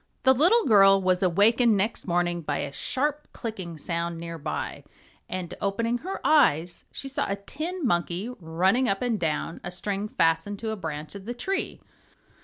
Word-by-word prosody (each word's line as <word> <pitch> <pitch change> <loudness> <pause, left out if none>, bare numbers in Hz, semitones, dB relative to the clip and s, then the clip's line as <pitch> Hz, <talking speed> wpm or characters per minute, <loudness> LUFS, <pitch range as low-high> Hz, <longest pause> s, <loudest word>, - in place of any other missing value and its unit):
The 260 - +6
little 360 - +4
girl 195 -3 +7
was 185 -1 +1
awakened 210 +5 +4
next 205 +2 -1
morning 175 -1 +1
by 155 - -2
a 140 - -3
sharp 290 - -2
clicking 185 -8 -6
sound 170 +1 -3
near 165 0 -6
by, 145 - -4 0.5
and 185 -2 -4
opening 230 +4 0
her 375 +7 -5
eyes 175 - +3
she 275 - -6
saw 270 - -1
a 200 - 0
tin 310 - -5
monkey 175 +1 0
running 185 +9 +2
up 195 +4 0
and 235 -4 0
down 165 0 -2
a 175 - -4
string 200 +3 -2
fastened 165 +2 +1
to 220 +1 -3
a - - -2
branch 155 -5 -6
of 200 -1 -9
the 240 +2 -4
tree. 385 +10 -2
195 Hz, 175 wpm, -26 LUFS, 170-240 Hz, 0.5 s, girl